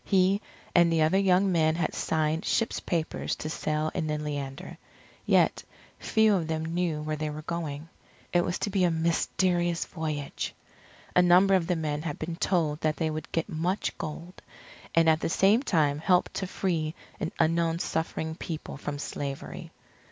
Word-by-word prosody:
He 195 +1 +3 0.3
and 170 -1 +5
the 160 -1 +3
other 160 +5 +3
young 190 0 +3
men 160 -2 +3
had 170 - -1
signed 155 +1 0
ship's 230 - 0
papers 165 -3 -2
to 155 - -5
sail 155 0 -1
in 165 -4 -2
the 150 0 -1
Leander, 145 -2 -5 0.5
yet - - +3 0.4
few 220 -1 +3
of 175 -5 0
them 160 0 -2
knew 165 -2 -1
where 155 0 -2
they 155 0 -2
were 150 +1 -6
going. 160 -2 -4 0.5
It 175 0 +4
was 175 - -1
to 205 - -4
be 190 -2 +2
a 175 - +4
mysterious 170 +1 +1
voyage. 155 -4 -4 0.6
A 180 - +7
number 180 +2 +6
of 180 -3 +3
the 180 - +1
men 150 -2 -2
had 155 -3 -4
been 165 +1 -4
told 165 -5 0
that 155 -1 +1
they 160 -2 0
would 155 0 -6
get 165 - -1
much 180 +2 -1
gold, 170 +4 -7 0.5
and 165 -1 +5
at 160 -1 +5
the - - -1
same 200 +7 +4
time 150 - +1
help 180 +3 +3
to 190 - -3
free 165 -4 -1 0.2
an 160 - -2
unknown 165 0 +2
suffering 160 -1 -2
people 160 -3 -6
from 145 0 -4
slavery. 140 -1 -5
165 Hz, 175 wpm, -28 LUFS, 155-180 Hz, 0.6 s, A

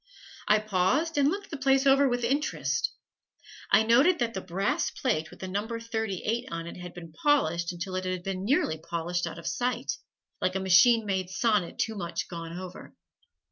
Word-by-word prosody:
I 210 - +6
paused 215 - +1
and 280 0 +4
looked 395 +3 -4
the 300 - -4
place 270 0 +3
over 275 0 +5
with 245 0 -1
interest. 280 +6 0 0.8
I 220 - +6
noted 270 +11 +5
that 235 -5 -1
the 190 - -4
brass 185 +3 -1
plate 155 +1 -1
with - - -14
the 190 - -4
"No. 200 +3 -2
38" 230 0 -3
on 165 0 -4
it 170 - -8
had 180 0 -9
been 165 -2 -10
polished 170 - +1
until 175 +2 -6
it 185 0 -2
had 185 -1 -3
been 190 0 -3
nearly 200 - +1
polished 170 +2 -2
out 165 - -7
of 170 - -10
sight, 245 +8 -1 0.4
like 185 - 0
a - - +1
machine 195 +5 +5
made 190 -2 -1
sonnet 210 -3 +1
too 225 - 0
much 175 -4 -4
gone 165 -1 -7
over. 185 -1 -9
195 Hz, 185 wpm, -28 LUFS, 175-245 Hz, 0.8 s, I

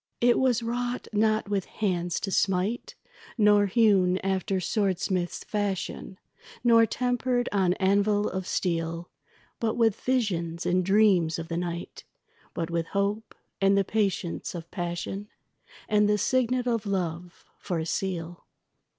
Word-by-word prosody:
It 240 0 +4
was 245 -3 +2
wrought 245 +1 -3
not 215 0 +2
with 200 -2 -1
hands 175 -5 -2
to 195 - -3
smite, 195 +5 0 0.4
Nor 205 -2 +5
hewn 195 -4 +3
after 190 0 0
swordsmiths' 185 -2 -1
fashion, 200 -2 -3 0.5
Nor 230 -2 +6
tempered 245 +1 0
on 190 -3 +2
anvil 205 +2 +2
of 190 -1 -4
steel; 170 -1 -2 0.5
But 225 -1 0
with 225 -4 +2
visions 175 -10 -1
and 180 +1 +2
dreams 190 -4 +3
of 165 0 -6
the 165 - -2
night, 175 0 -5 0.5
But 165 0 -3
with 165 -1 -1
hope, 205 +2 -2 0.3
and 195 0 +4
the 200 - +4
patience 195 -4 -2
of 170 -1 -8
passion, 175 +3 -4 0.6
And 210 -1 +3
the 210 - +3
signet 255 +2 +1
of 230 -3 -1
love 175 -2 -3
for 180 -4 -3
a 160 - -2
seal. 175 -1 -4
195 Hz, 135 wpm, -27 LUFS, 175-220 Hz, 0.6 s, Nor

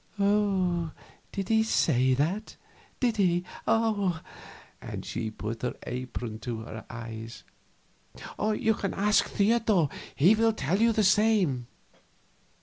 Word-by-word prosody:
"Did 195 -2 -1
he 220 0 +4
say 130 - +2
that? 175 - -1 0.4
Did 235 -3 +1
he?" 180 -3 +2 0.2
and 210 -5 +2 0.9
she 110 0 -3
put 110 +1 -6
her 125 - -2
apron 125 -3 -5
to 115 0 -4
her 110 -1 -8
eyes. 115 0 -8 1.0
"You 220 +1 +1
can 200 -2 -3
ask 210 +2 +3
Theodor 205 -6 +2 0.3
he 175 +9 +6
will 225 +1 +3
tell 185 +3 0
you 230 0 +5
the 220 -1 +2
same." 190 - +3
185 Hz, 115 wpm, -28 LUFS, -, 1.0 s, he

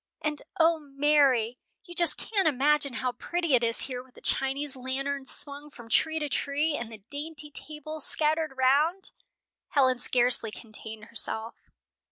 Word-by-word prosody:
"And, 300 -1 -1 0.2
O 325 0 +4
Mary, 275 -5 +2 0.2
you 350 - -11
just 340 -3 +2
can't 400 -6 0
imagine 290 0 +2
how 255 +1 -1
pretty 335 +5 -2
it 245 -2 +4
is 230 0 +4
here 250 -2 -2
with 255 0 -21
the - - -14
Chinese 270 +1 0
lanterns 265 +2 -3
swung 290 +1 +2
from 235 -5 -13
tree 315 +6 +2
to 300 -2 -1
tree, 290 +2 0
and 235 -4 -5
the 215 -3 -11
dainty 300 0 -6
tables 305 0 -3
scattered 310 -2 +1
round!" 300 +9 +2 0.6
Helen 260 -3 +3
scarcely 245 -2 +2
contain 215 0 -9
herself. 225 0 -5
280 Hz, 155 wpm, -28 LUFS, 250-305 Hz, 0.6 s, O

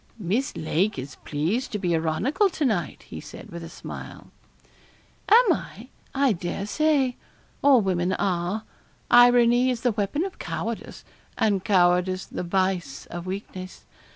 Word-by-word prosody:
'Miss 220 +7 -1
Lake 180 +5 0
is 135 +1 -7
pleased 165 - -2
to - - 0
be 180 -4 0
ironical 165 - +1
to 320 -4 -2
night,' 200 - -1
he - - -9
said, - - -11
with 170 0 -7
a 165 - -8
smile. - - -9 1.0
'Am 445 -3 +7
I? 235 -4 -7 0.3
I 270 -3 +3
dare 175 +2 -4
say. 275 +1 +1 0.4
All 275 -4 +6
women 185 -2 0
are. 185 +2 -1 0.5
Irony 245 +1 +6
is 245 -2 -2
the 245 - +2
weapon 215 - -1
of 390 - -8
cowardice, - - -5 0.3
and 200 -4 +1
cowardice 185 -1 +2
the - - -6
vice 180 -5 -1
of 175 +1 -6
weakness. 185 -1 -7
200 Hz, 145 wpm, -25 LUFS, 175-245 Hz, 1.0 s, Am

